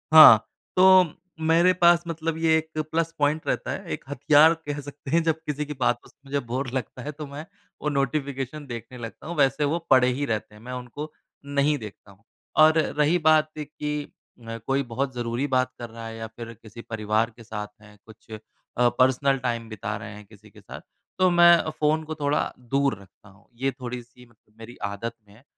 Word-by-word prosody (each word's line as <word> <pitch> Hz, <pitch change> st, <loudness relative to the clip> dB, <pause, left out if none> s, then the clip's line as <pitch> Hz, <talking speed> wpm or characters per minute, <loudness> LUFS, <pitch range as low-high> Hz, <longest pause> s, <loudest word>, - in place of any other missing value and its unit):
हाँ, 120 Hz, -9 st, +10 dB, 0.3 s
तो 185 Hz, -3 st, +6 dB, 0.3 s
मेरे 165 Hz, +3 st, +4 dB
पास 175 Hz, -1 st, +4 dB
मतलब 165 Hz, -1 st, -3 dB
ये 160 Hz, -1 st, +3 dB
एक 160 Hz, 0 st, -6 dB
प्लस 165 Hz, 0 st, 0 dB
पॉइंट 150 Hz, +2 st, +1 dB
रहता -, -, -1 dB
है, -, -, -5 dB
एक -, -, -6 dB
हथियार 145 Hz, +3 st, +5 dB
कह 145 Hz, 0 st, -3 dB
सकते 145 Hz, -1 st, -9 dB
हैं, 170 Hz, -, +4 dB
जब 160 Hz, -1 st, 0 dB
किसी 150 Hz, 0 st, -2 dB
की 150 Hz, -, -6 dB
बातों 120 Hz, -1 st, 0 dB
से -, -, -27 dB
मुझे 140 Hz, +1 st, -1 dB
बोर 130 Hz, +3 st, -2 dB
लगता 130 Hz, -1 st, -4 dB
है 150 Hz, -, -4 dB
तो 150 Hz, +1 st, -8 dB
मैं 145 Hz, +3 st, -8 dB, 0.4 s
वो 150 Hz, -, 0 dB
नोटिफिकेशन 140 Hz, 0 st, -2 dB
देखने 120 Hz, +1 st, -8 dB
लगता 115 Hz, +5 st, -9 dB
हूँ। 170 Hz, -, -4 dB
वैसे 140 Hz, +1 st, +3 dB
वो 160 Hz, +4 st, 0 dB
पड़े 130 Hz, -1 st, +6 dB
ही 130 Hz, +3 st, 0 dB
रहते 110 Hz, -3 st, -3 dB
हैं, 105 Hz, -, -15 dB
मैं 125 Hz, +2 st, -7 dB
उनको 125 Hz, +5 st, -7 dB, 0.3 s
नहीं 140 Hz, +1 st, +1 dB
देखता 105 Hz, -3 st, -11 dB
हूँ। 100 Hz, +3 st, -22 dB, 0.4 s
और 155 Hz, +1 st, +7 dB
रही 150 Hz, +2 st, +2 dB
बात 155 Hz, 0 st, +4 dB
कि 150 Hz, 0 st, -4 dB, 0.4 s
अ, 115 Hz, 0 st, -5 dB
कोई 135 Hz, +1 st, +1 dB
बहुत 130 Hz, +2 st, -3 dB
ज़रूरी 120 Hz, +2 st, -2 dB
बात 130 Hz, -1 st, +1 dB
कर 120 Hz, -1 st, -6 dB
रहा 115 Hz, 0 st, -9 dB
है 115 Hz, -, -7 dB
या 115 Hz, 0 st, -5 dB
फिर 115 Hz, +1 st, -9 dB
किसी 110 Hz, +1 st, -11 dB
परिवार 110 Hz, 0 st, -1 dB
के 115 Hz, -, -12 dB
साथ 105 Hz, -2 st, -5 dB
हैं, 105 Hz, -1 st, -17 dB
कुछ 110 Hz, 0 st, -17 dB
अ, 110 Hz, -, -5 dB, 0.6 s
पर्सनल 130 Hz, +2 st, +3 dB
टाइम 120 Hz, -2 st, -2 dB
बिता 105 Hz, -1 st, -4 dB
रहे 105 Hz, -1 st, -8 dB
हैं 105 Hz, 0 st, -12 dB
किसी 105 Hz, +1 st, -18 dB
के -, -, -17 dB
साथ, -, -, -10 dB, 0.4 s
तो 185 Hz, 0 st, +5 dB
मैं 175 Hz, 0 st, +7 dB
अ, 160 Hz, -, -2 dB
फ़ोन 155 Hz, 0 st, 0 dB
को 155 Hz, 0 st, -6 dB
थोड़ा 145 Hz, -1 st, 0 dB
दूर 135 Hz, 0 st, 0 dB
रखता 100 Hz, +2 st, -19 dB
हूँ। 95 Hz, +2 st, -22 dB, 0.2 s
ये 135 Hz, -, +2 dB
थोड़ी-सी 125 Hz, -1 st, -9 dB
मत 115 Hz, -, -27 dB, 0.2 s
मेरी 115 Hz, +2 st, -11 dB
आदत 115 Hz, +4 st, -5 dB
में 100 Hz, -, -19 dB
है, 120 Hz, -, -20 dB
135 Hz, 205 wpm, -25 LUFS, 115-155 Hz, 0.6 s, हाँ